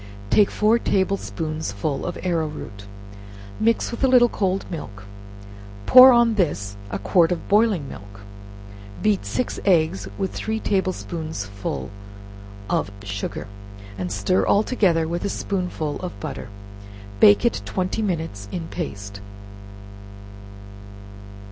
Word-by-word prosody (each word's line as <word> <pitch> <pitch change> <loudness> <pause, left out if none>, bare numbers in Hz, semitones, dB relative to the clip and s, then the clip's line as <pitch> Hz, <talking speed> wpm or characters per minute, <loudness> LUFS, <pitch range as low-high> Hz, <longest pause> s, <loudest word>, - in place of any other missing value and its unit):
Take 205 -2 +5
four 220 +3 +2
table 195 -3 +1
spoonsful 155 - -4
of 175 - -4
arrow 170 -3 0
root, 105 -9 -9 0.7
mixed 230 +2 +1
in 235 - -4
a - - +6
little 250 -2 +6
cold 195 -2 -1
milk; 105 - -7 0.8
pour 255 +1 +10
on 235 -2 +4
this 145 - -1
a 95 - -3
quart 165 - +3
of 175 - -3
boiling 205 -8 +2
milk, 100 -2 -11 0.8
beat 210 -2 +1
six 250 - -2
eggs 160 - +2
with 190 - -2
three 220 0 -3
table 190 -3 0
spoonsful 105 - -5 0.8
of - - 0
sugar, 100 0 -5 0.5
and 90 -2 -4
stir 100 - +1
all 205 - +3
together 175 -10 +1
with 170 +1 -3
a 200 - -1
spoonful 180 -7 -3
of 180 -1 -7
butter, 140 -6 -6 0.7
bake 100 0 +6
it 100 - +1
twenty 185 - -2
minutes 160 - -3
in 165 -2 -5
paste. 100 - -6
165 Hz, 125 wpm, -23 LUFS, -, 0.8 s, pour